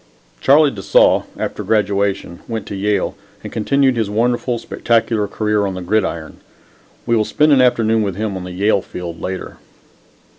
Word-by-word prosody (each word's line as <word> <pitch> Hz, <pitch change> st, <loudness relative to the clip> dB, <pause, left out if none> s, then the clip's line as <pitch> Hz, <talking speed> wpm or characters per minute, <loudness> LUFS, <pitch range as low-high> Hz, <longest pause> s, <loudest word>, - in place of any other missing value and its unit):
Charlie 145 Hz, +1 st, +5 dB
de 100 Hz, -, -8 dB
Saulles, -, -, +4 dB
after -, -, -4 dB
graduation, 100 Hz, -4 st, 0 dB
went 110 Hz, -3 st, -4 dB
to 100 Hz, -, -6 dB
Yale 105 Hz, +1 st, 0 dB, 0.3 s
and -, -, -8 dB
continued 135 Hz, +4 st, +2 dB
his 110 Hz, -3 st, 0 dB
wonderful, 120 Hz, +3 st, 0 dB
spectacular 115 Hz, -2 st, 0 dB
career 105 Hz, 0 st, 0 dB
on 95 Hz, -, -4 dB
the 95 Hz, -, -5 dB
gridiron. 90 Hz, -5 st, -1 dB, 0.7 s
We 120 Hz, -, +2 dB
will 110 Hz, -, +3 dB
spend 150 Hz, +7 st, +2 dB
an 135 Hz, -2 st, +5 dB
afternoon 115 Hz, -3 st, +3 dB
with 100 Hz, -4 st, -2 dB
him 105 Hz, -1 st, -3 dB
on 95 Hz, -, -5 dB
the 90 Hz, -, -7 dB
Yale 100 Hz, +2 st, +1 dB
field 85 Hz, -2 st, -8 dB
later. 95 Hz, 0 st, -5 dB
105 Hz, 165 wpm, -18 LUFS, 100-115 Hz, 0.7 s, Charlie